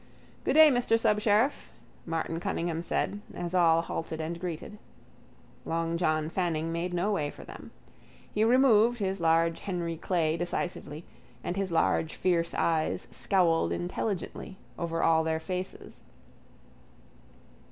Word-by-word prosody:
—Good - - +2
day, 315 -1 +9
Mr 245 -3 +2
Subsheriff, 210 +4 +2 0.4
Martin 165 0 -2
Cunningham 170 -1 -2
said, 200 +4 -2
as 175 0 -4
all 165 -2 +4
halted 160 -1 -4
and 165 +2 -4
greeted. 180 +4 -6 0.8
Long 165 0 -1
John 155 -2 +1
Fanning 165 -2 -1
made 170 +2 -2
no 180 +4 0
way 150 -8 0
for - - -11
them. - - -11 0.6
He 210 - +2
removed 240 -1 +5
his 195 -3 -2
large 165 0 +2
Henry 170 -4 -3
Clay 165 -2 0
decisively 175 -2 -4 0.4
and 175 - -3
his 195 -2 -2
large 165 -1 +1
fierce 170 -2 0
eyes 160 -2 0
scowled 165 - +2
intelligently 180 - -4 0.2
over 165 -1 -2
all 160 -1 +4
their 160 0 -1
faces. 185 +3 -6
170 Hz, 130 wpm, -29 LUFS, 165-195 Hz, 0.8 s, day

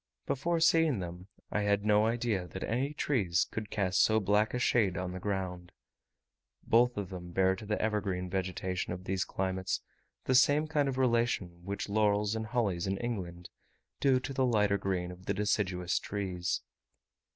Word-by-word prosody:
Before 165 +5 0
seeing 165 -4 +4
them, 90 0 -6 0.2
I 105 - 0
had 100 0 +1
no 105 +1 +4
idea 115 -6 -1
that 95 - -6
any 130 +5 -1
trees 105 - +1
could 110 -2 -5
cast 95 -3 +1
so 110 0 +4
black 105 +3 +2
a - - +1
shade 110 -6 +2
on 90 0 -3
the 90 - -6
ground. 90 -3 -3 0.9
Both 120 +1 +3
of 100 -3 -3
them 90 -1 -7
bear 95 0 +3
to 105 +2 -10
the 105 - -1
evergreen 100 -4 -1
vegetation 95 -1 -2
of 90 +1 -7
these 95 -1 -1
climates 95 0 -2 0.4
the 130 - 0
same 145 +4 +5
kind 150 -3 +1
of 130 - -3
relation 115 -9 0
which 100 +2 -4
laurels 105 0 +2
and 110 0 -3
hollies 105 -7 0
in 95 0 -1
England 90 -7 -5 0.5
do 135 -2 +4
to 135 +2 -5
the 130 0 +1
lighter 105 -5 +2
green 90 -2 -2
of 90 +1 -13
the 100 - 0
deciduous 95 -3 0
trees. 95 -3 -2
100 Hz, 175 wpm, -31 LUFS, 95-115 Hz, 0.9 s, same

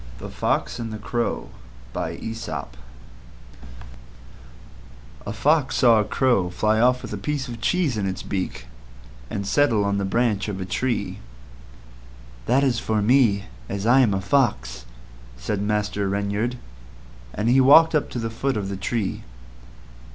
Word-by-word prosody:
THE - - -8
FOX - - -1
AND 115 -1 -4
THE 110 - -5
CROW 120 +2 -3 0.4
A - - -3
fox 110 - -5 2.7
once 150 -2 +3
saw 115 -4 +5
a - - +2
Crow 105 -5 +1
fly 110 +4 +1
off 125 +2 +3
with - - -6
a 105 - -4
piece 140 +5 -2
of 120 -2 -8
cheese 170 -7 +1
in 100 -2 -1
its 95 0 -4
beak 95 -9 -4 0.6
and 100 -1 -4
settle 115 -1 +2
on 100 0 0
a - - -1
branch 110 0 0
of 100 -2 -4
a 95 - -3
tree. 120 +7 -2 1.3
"That's 130 -1 +2
for 110 -1 0
me, 115 -4 +3 0.2
as 100 +1 -3
I 125 +3 +5
am 110 -7 +3
a 95 - -2
Fox," 65 - 0 0.5
said 95 - -3
Master 105 -1 -1
Reynard, 100 +5 -1 0.7
and 105 - -2
he 130 +3 +5
walked 160 +5 +7
up 150 - +1
to - - -6
the 115 -1 -3
foot 130 +2 -1
of 100 -2 -3
the 100 - -4
tree. 100 +1 -2
110 Hz, 150 wpm, -23 LUFS, 100-125 Hz, 2.7 s, walked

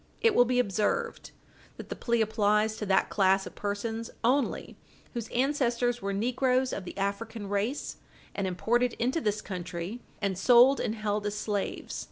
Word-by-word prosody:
It 455 -2 +4
will 245 - +6
be 250 +1 0
observed 250 - 0 0.5
that - - -9
the - - -4
plea 235 -1 0
applies 215 0 +2
to 210 - -4
that 190 0 +2
class 195 -1 +3
of - - -9
persons 225 +3 -3
only 265 +4 +1 0.4
whose 235 -3 -4
ancestors 245 -2 0
were 200 - -2
negroes 250 +5 +1
of 190 - -4
the - - -8
African 205 +2 -3
race, 205 +7 -2 0.4
and 195 -2 -2
imported 230 +7 +1
into 255 +7 -1
this 210 -3 -1
country 180 +4 -5 0.2
and 195 -3 -1
sold 245 +5 +6
and 215 - -1
held 210 -1 -1
as 205 - -3
slaves. 205 -2 -3
220 Hz, 165 wpm, -29 LUFS, 200-245 Hz, 0.5 s, will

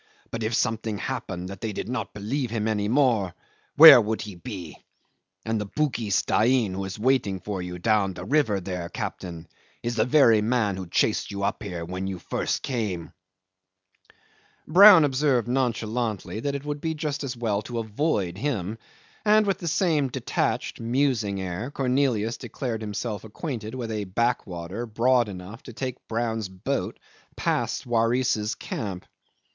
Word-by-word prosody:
But 115 - -4
if 110 +1 0
something 110 -2 -1
happened 90 -2 -4
that 100 -1 -9
they 110 -2 -3
did - - -4
not 115 -3 -3
believe 120 +5 -2
him 110 -1 -1
any 105 -2 0
more, 115 -7 +2 0.4
where 155 -5 +11
would 110 0 -2
he 105 - -7
be? 90 - -8 0.6
And 110 -1 -1
the 105 - -4
Bugis 115 -5 0
Dain 115 -3 +2
who 95 +1 -3
is 95 - -6
waiting 110 -5 +1
for 100 -1 -4
you 90 0 -5
down 100 0 +1
the - - -7
river 130 -9 +2
there, 90 -2 -5
captain, 85 -1 -6 0.4
is 120 0 -2
the 110 - +3
very 120 -5 +5
man 110 -3 +1
who 95 -1 -6
chased - - +1
you 100 0 -4
up 100 - -1
here 90 -6 -5
when 90 +2 -4
you 95 -1 -4
first - - -2
came." 105 -10 -3 1.5
Brown 185 0 +9
observed 135 -3 +1
nonchalantly 115 -4 -1
that 140 +4 -2
it 140 +1 -5
would 145 0 -4
be 160 -1 -2
just 150 -1 -3
as 130 -3 -4
well 110 -4 0
to 120 +2 -6
avoid 110 - -1
him, 115 -5 -2 0.4
and 215 0 +5
with 195 -1 0
the 170 - -5
same 160 -4 +2
detached, 125 - -2
musing 115 -4 0
air 95 +6 -4
Cornelius 125 -5 0
declared 120 -1 -4
himself 105 0 -4
acquainted 110 0 -5
with 120 -3 -4
a 105 -2 -2
backwater 100 -1 -2
broad 120 +1 +2
enough 95 +4 -9
to 120 - -11
take 130 +1 -5
Brown's 115 -3 -2
boat 100 +9 -3 0.4
past - - -1
Waris's 115 -2 +1
camp. 95 -5 -5
115 Hz, 160 wpm, -25 LUFS, 100-130 Hz, 1.5 s, where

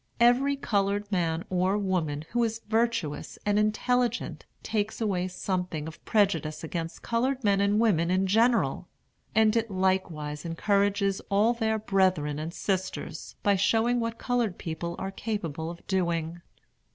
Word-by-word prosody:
Every 250 +4 +4
colored 205 -4 0
man 170 -3 0
or 185 +2 +2
woman 165 -7 -1
who 240 0 +2
is 225 0 -2
virtuous 220 -9 -1
and 205 0 +3
intelligent 240 +3 0 0.2
takes 215 -1 -2
away 190 -5 0
something 180 -4 -3
of 160 - -10
prejudice 170 -9 +1
against 165 0 -5
colored 255 +3 0
men 200 -1 +3
and 200 +1 +3
women 180 -7 +3
in 185 +1 +2
general; 230 +5 +2 0.5
and 220 0 +4
it 230 0 +1
likewise 185 -6 -1
encourages 200 +3 +1
all 210 +4 +3
their 220 -2 0
brethren 185 -8 +1
and 160 +2 -4
sisters, 190 +1 -3
by 200 -1 +4
showing 225 +5 +2
what 230 0 -2
colored 240 -7 0
people 170 +1 -4
are 190 0 -4
capable 170 -7 -3
of 170 0 -10
doing. 170 -3 -1
195 Hz, 140 wpm, -28 LUFS, 170-220 Hz, 0.5 s, Every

